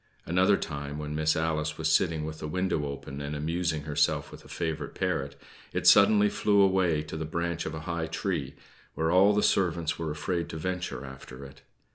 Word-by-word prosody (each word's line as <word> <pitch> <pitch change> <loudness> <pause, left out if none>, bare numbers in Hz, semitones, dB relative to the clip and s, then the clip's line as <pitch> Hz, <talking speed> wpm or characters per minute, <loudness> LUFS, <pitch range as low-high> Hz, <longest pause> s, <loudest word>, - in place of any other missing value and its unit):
Another 95 +4 +3
time, 70 -1 -5
when 75 0 -5
Miss 80 +1 +1
Alice 75 -1 -1
was 80 - -1
sitting 80 -3 +2
with 80 0 -6
the 75 - -5
window 90 -3 -1
open 70 0 -7
and 70 +1 -4
amusing 80 +1 -1
herself 75 -1 0
with - - -12
a - - -15
favorite 80 -2 -4
parrot, 70 0 -2 0.3
it - - -2
suddenly 105 +1 +7
flew 100 0 +2
away 95 -5 +3
to 75 - -8
the 80 - -3
branch 85 +1 -2
of 80 - -5
a 80 - -6
high 85 0 -3
tree, - - -3 0.4
where 80 0 0
all 95 +3 +6
the 105 0 +2
servants 85 -3 +1
were 80 -1 -2
afraid 85 +3 -2
to 80 - -6
venture 90 -6 -4
after 65 0 -10
it. 70 - -14
80 Hz, 195 wpm, -28 LUFS, 75-90 Hz, 0.4 s, suddenly